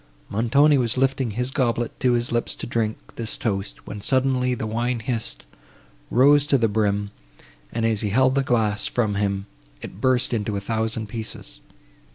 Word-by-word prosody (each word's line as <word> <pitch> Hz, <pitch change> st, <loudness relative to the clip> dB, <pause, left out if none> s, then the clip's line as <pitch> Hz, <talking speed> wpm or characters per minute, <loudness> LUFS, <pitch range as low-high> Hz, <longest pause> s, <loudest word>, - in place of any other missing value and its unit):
Montoni 140 Hz, +7 st, +4 dB
was 120 Hz, 0 st, 0 dB
lifting 135 Hz, -1 st, +1 dB
his 125 Hz, +5 st, -2 dB
goblet 120 Hz, -3 st, -1 dB
to 125 Hz, -1 st, +3 dB
his 120 Hz, 0 st, 0 dB
lips 120 Hz, 0 st, -1 dB
to -, -, -6 dB
drink 115 Hz, -2 st, -1 dB, 0.2 s
this 115 Hz, -2 st, -3 dB
toast, 100 Hz, -2 st, -3 dB
when 105 Hz, 0 st, -7 dB
suddenly 130 Hz, +1 st, +1 dB
the 115 Hz, -, -4 dB
wine 120 Hz, +2 st, -1 dB
hissed, 115 Hz, -, -4 dB, 0.6 s
rose 140 Hz, +3 st, +5 dB
to 140 Hz, -, +4 dB
the 115 Hz, -3 st, +2 dB
brim, 105 Hz, -1 st, 0 dB, 0.6 s
and, 115 Hz, 0 st, -1 dB
as 110 Hz, -2 st, +2 dB
he 105 Hz, -, -1 dB
held 130 Hz, +5 st, +3 dB
the 140 Hz, -, +2 dB
glass 110 Hz, -5 st, +1 dB
from 110 Hz, -4 st, 0 dB
him, 100 Hz, -1 st, -1 dB, 0.4 s
it 95 Hz, -, -9 dB
burst 130 Hz, -1 st, +2 dB
into 105 Hz, -2 st, -1 dB
a -, -, -1 dB
thousand 110 Hz, +2 st, -2 dB
pieces. 110 Hz, -, -6 dB
115 Hz, 175 wpm, -23 LUFS, 105-125 Hz, 0.6 s, rose